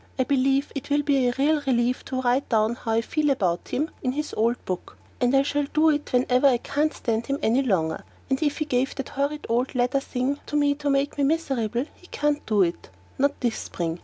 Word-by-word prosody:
I 260 Hz, -, +3 dB
believe 275 Hz, +1 st, +1 dB
it 275 Hz, 0 st, -6 dB
will 290 Hz, +1 st, +2 dB
be 275 Hz, -3 st, +2 dB
a 245 Hz, -, +1 dB
real 295 Hz, +2 st, +2 dB
relief 245 Hz, 0 st, +1 dB
to 260 Hz, -1 st, -2 dB
write 250 Hz, +3 st, +1 dB
down 220 Hz, -1 st, +2 dB
how 230 Hz, -1 st, -3 dB
I 225 Hz, -, +3 dB
feel 300 Hz, +5 st, 0 dB
about 185 Hz, -10 st, 0 dB
him 305 Hz, +4 st, -2 dB
in 255 Hz, -1 st, -1 dB
his 300 Hz, +2 st, -3 dB
old 235 Hz, +3 st, +2 dB
book, 185 Hz, -1 st, -5 dB, 0.2 s
and 245 Hz, +1 st, +2 dB
I 270 Hz, -, +5 dB
shall 290 Hz, 0 st, 0 dB
do 310 Hz, +1 st, +5 dB
it 295 Hz, 0 st, -2 dB
whenever 250 Hz, +2 st, +3 dB
I 255 Hz, -3 st, +4 dB
can't 295 Hz, +5 st, 0 dB
stand 230 Hz, -4 st, -2 dB
him 275 Hz, 0 st, 0 dB
any 235 Hz, +5 st, +3 dB
longer; 175 Hz, -11 st, 0 dB, 0.2 s
and 265 Hz, +2 st, 0 dB
if 295 Hz, -2 st, 0 dB
he 310 Hz, -, -1 dB
gave 260 Hz, -2 st, 0 dB
the 270 Hz, -, -4 dB
horrid, 285 Hz, +2 st, -2 dB
red 245 Hz, +3 st, 0 dB
leather 250 Hz, +2 st, +2 dB
thing 270 Hz, +1 st, -2 dB
to -, -, -4 dB
me 290 Hz, -1 st, +3 dB
to 290 Hz, 0 st, -3 dB
make 275 Hz, +1 st, 0 dB
me -, -, +3 dB
miserable 270 Hz, -6 st, 0 dB
he 360 Hz, -, -19 dB
can't 295 Hz, -2 st, -1 dB
do 210 Hz, -3 st, +4 dB
it; 170 Hz, -, -3 dB, 0.3 s
not 280 Hz, +1 st, +1 dB
this 240 Hz, -3 st, 0 dB
spring! 170 Hz, -1 st, -4 dB
270 Hz, 230 wpm, -25 LUFS, 240-285 Hz, 0.3 s, I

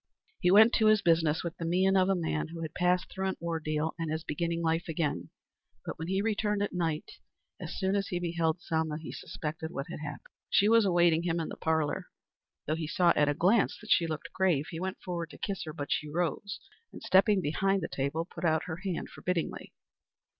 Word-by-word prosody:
He 180 Hz, -, +3 dB
went 220 Hz, +5 st, +7 dB
to 220 Hz, -, +4 dB
his 215 Hz, -1 st, +5 dB
business 160 Hz, -2 st, +3 dB
with 170 Hz, -2 st, -4 dB
the -, -, -5 dB
mien 185 Hz, +3 st, +3 dB
of 185 Hz, 0 st, +4 dB
a 195 Hz, -, +3 dB
man 160 Hz, -3 st, -1 dB
who 165 Hz, 0 st, -7 dB
had 160 Hz, 0 st, -5 dB
passed 180 Hz, +1 st, +1 dB
through 190 Hz, 0 st, -2 dB
an 190 Hz, -, -2 dB
ordeal 160 Hz, -2 st, -2 dB
and 165 Hz, -2 st, -2 dB
is 160 Hz, 0 st, -2 dB
beginning 170 Hz, +2 st, -2 dB
life 165 Hz, +1 st, 0 dB
again; 150 Hz, -, -2 dB, 0.6 s
but -, -, -6 dB
when 160 Hz, -, -4 dB
he 190 Hz, +2 st, 0 dB
returned 210 Hz, -1 st, 0 dB
at 205 Hz, -, -3 dB
night, 165 Hz, -4 st, -2 dB, 0.4 s
as -, -, -6 dB
soon 190 Hz, 0 st, +1 dB
as 200 Hz, -1 st, 0 dB
he 175 Hz, -, -2 dB
beheld 170 Hz, 0 st, -1 dB
Selma, 160 Hz, -1 st, -1 dB
he 160 Hz, -, -7 dB
suspected 160 Hz, 0 st, -5 dB
what 140 Hz, -4 st, -4 dB
had -, -, -6 dB
happened. 150 Hz, -2 st, -7 dB, 0.2 s
She 205 Hz, -, +4 dB
was 230 Hz, -1 st, +5 dB
awaiting 175 Hz, -3 st, +4 dB
him 170 Hz, -1 st, 0 dB
in 160 Hz, -, -3 dB
the -, -, -6 dB
parlor. 160 Hz, -2 st, 0 dB, 0.6 s
Though 155 Hz, -, 0 dB
he 160 Hz, -1 st, -3 dB
saw 175 Hz, +2 st, +3 dB
at 150 Hz, -1 st, +3 dB
a 145 Hz, -, +1 dB
glance 200 Hz, +7 st, +3 dB
that 215 Hz, -, -8 dB
she 165 Hz, -, +4 dB
looked 155 Hz, -1 st, -5 dB
grave, 175 Hz, -7 st, +2 dB
he 165 Hz, -, -5 dB
went 190 Hz, +2 st, -4 dB
forward 170 Hz, -3 st, -4 dB
to -, -, -12 dB
kiss 195 Hz, -3 st, -3 dB
her, 155 Hz, -, -5 dB
but 145 Hz, -2 st, -5 dB
she 150 Hz, -, 0 dB
rose 175 Hz, +5 st, -2 dB, 0.3 s
and, -, -, -11 dB
stepping 195 Hz, +2 st, +4 dB
behind 195 Hz, +4 st, +1 dB
the -, -, -1 dB
table, 140 Hz, +5 st, -2 dB
put 170 Hz, -1 st, -10 dB
out 160 Hz, -2 st, +2 dB
her 160 Hz, -2 st, -5 dB
hand 185 Hz, -2 st, -3 dB
forbiddingly. 180 Hz, -3 st, -3 dB
170 Hz, 220 wpm, -30 LUFS, 160-190 Hz, 0.6 s, went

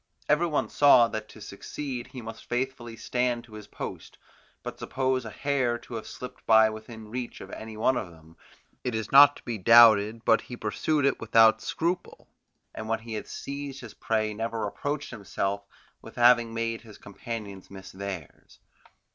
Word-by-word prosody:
Every 150 Hz, +4 st, +3 dB
one 150 Hz, -3 st, 0 dB
saw 130 Hz, -5 st, +6 dB
that 110 Hz, -1 st, -5 dB
to -, -, -14 dB
succeed 125 Hz, +5 st, -6 dB
he 125 Hz, -3 st, -9 dB
must 115 Hz, 0 st, -9 dB
faithfully 120 Hz, -2 st, -3 dB
stand 125 Hz, 0 st, -1 dB
to 115 Hz, -2 st, -17 dB
his 105 Hz, -1 st, -10 dB
post; -, -, -8 dB, 0.5 s
but -, -, -7 dB
suppose 130 Hz, -1 st, -1 dB
a -, -, -5 dB
hare 125 Hz, +1 st, 0 dB
to 120 Hz, -, -13 dB
have 110 Hz, -2 st, -5 dB
slipped 125 Hz, -, -9 dB
by 110 Hz, 0 st, +6 dB
within 110 Hz, 0 st, -10 dB
reach 125 Hz, +1 st, -5 dB
of 95 Hz, -, -10 dB
any 110 Hz, 0 st, -8 dB
one 130 Hz, +4 st, +2 dB
of 100 Hz, -, -3 dB
them, 80 Hz, 0 st, -18 dB, 0.5 s
it 125 Hz, -3 st, -2 dB
is 110 Hz, -1 st, -4 dB
not 145 Hz, +1 st, +8 dB
to -, -, -14 dB
be 115 Hz, -3 st, -4 dB
doubted 110 Hz, +1 st, +6 dB
but 115 Hz, -, +4 dB
he 125 Hz, -, -9 dB
pursued 140 Hz, +7 st, 0 dB
it 140 Hz, -, +1 dB
without 110 Hz, 0 st, +5 dB
scruple, 175 Hz, +2 st, -3 dB, 0.5 s
and 110 Hz, 0 st, -7 dB
when 115 Hz, 0 st, 0 dB
he 115 Hz, 0 st, -8 dB
had 110 Hz, -, -5 dB
seized 140 Hz, 0 st, -6 dB
his 120 Hz, -4 st, -10 dB
prey 110 Hz, -1 st, -1 dB
never 115 Hz, 0 st, -3 dB
reproached 145 Hz, +7 st, -4 dB
himself 100 Hz, -2 st, -3 dB, 0.3 s
with -, -, -13 dB
having 120 Hz, -1 st, +5 dB
made 115 Hz, 0 st, -3 dB
his 110 Hz, -2 st, -14 dB
companions 100 Hz, -2 st, -8 dB
miss 95 Hz, 0 st, -11 dB
theirs. 95 Hz, -5 st, -8 dB
115 Hz, 180 wpm, -27 LUFS, 110-125 Hz, 0.5 s, not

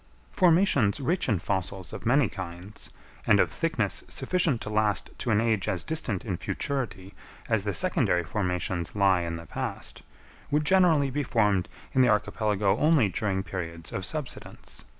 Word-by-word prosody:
Formations 165 Hz, -, +3 dB
rich 170 Hz, +4 st, 0 dB
in 105 Hz, -, +2 dB
fossils 95 Hz, 0 st, -3 dB
of -, -, -6 dB
many 130 Hz, +1 st, +4 dB
kinds, 90 Hz, +2 st, -9 dB, 0.4 s
and -, -, +5 dB
of -, -, +3 dB
thickness -, -, -1 dB
sufficient 170 Hz, -9 st, +1 dB
to -, -, -5 dB
last 105 Hz, -2 st, +1 dB
to 125 Hz, -, -3 dB
an 105 Hz, -2 st, +3 dB
age 110 Hz, -3 st, +1 dB
as 95 Hz, -, 0 dB
distant 140 Hz, -, -2 dB
in 95 Hz, -6 st, -2 dB
futurity 115 Hz, -, -3 dB, 0.3 s
as 110 Hz, -3 st, 0 dB
the 100 Hz, -, -1 dB
secondary 85 Hz, +1 st, +2 dB
formations 90 Hz, -1 st, -2 dB
lie 95 Hz, -3 st, +3 dB
in 85 Hz, -1 st, -3 dB
the 85 Hz, 0 st, -8 dB
past, -, -, -5 dB, 0.5 s
would 150 Hz, +1 st, +1 dB
generally 165 Hz, -6 st, +4 dB
be 145 Hz, +3 st, -1 dB
formed 105 Hz, -8 st, +1 dB, 0.2 s
in 130 Hz, -, +4 dB
the 125 Hz, -, +5 dB
archipelago 105 Hz, -2 st, +1 dB
only 150 Hz, -9 st, +4 dB
during 100 Hz, -4 st, -1 dB
periods 85 Hz, -4 st, -6 dB
of 95 Hz, -, -3 dB
subsidence. 135 Hz, -, -5 dB
105 Hz, 160 wpm, -27 LUFS, 95-135 Hz, 0.5 s, and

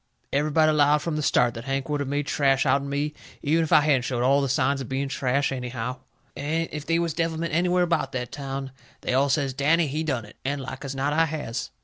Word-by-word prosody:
Everybody 155 Hz, +2 st, +3 dB
'lowed 150 Hz, 0 st, +3 dB
from 165 Hz, -2 st, -2 dB
the 155 Hz, -, -1 dB
start 125 Hz, -4 st, +3 dB
that 115 Hz, 0 st, -8 dB
Hank 135 Hz, 0 st, -2 dB
would 145 Hz, -1 st, -1 dB
of 140 Hz, -, -3 dB
made 145 Hz, +1 st, -1 dB
trash 135 Hz, -2 st, +2 dB
out'n 140 Hz, +1 st, +2 dB
me, 145 Hz, +2 st, -1 dB, 0.3 s
even 160 Hz, +3 st, +2 dB
if 160 Hz, -, -4 dB
I 155 Hz, -3 st, +7 dB
hadn't 145 Hz, -3 st, +3 dB
showed 125 Hz, -2 st, -2 dB
all 135 Hz, +2 st, +4 dB
the 140 Hz, -, -1 dB
signs 135 Hz, +1 st, +1 dB
of 130 Hz, -, -7 dB
being 135 Hz, +1 st, -1 dB
trash 135 Hz, +1 st, 0 dB
anyhow. 125 Hz, -1 st, -4 dB, 0.4 s
And 160 Hz, +3 st, -1 dB
if 150 Hz, -1 st, -6 dB
they 165 Hz, -, +2 dB
was 170 Hz, -2 st, 0 dB
devilment 165 Hz, 0 st, -2 dB
anywhere 180 Hz, +2 st, +3 dB
about 170 Hz, -2 st, 0 dB
that 125 Hz, -1 st, -3 dB
town 135 Hz, -1 st, -5 dB, 0.3 s
they -, -, -2 dB
all 135 Hz, +2 st, +3 dB
says, 135 Hz, -1 st, +1 dB
"Danny, 155 Hz, +5 st, +3 dB
he 150 Hz, +2 st, -2 dB
done 130 Hz, -8 st, -2 dB
it." 105 Hz, -, -16 dB
And 140 Hz, +2 st, -1 dB
like 130 Hz, +1 st, -7 dB
as 135 Hz, -1 st, -5 dB
not 140 Hz, +2 st, 0 dB
I 165 Hz, +2 st, +4 dB
has. 150 Hz, -7 st, -4 dB
140 Hz, 240 wpm, -25 LUFS, 135-155 Hz, 0.4 s, I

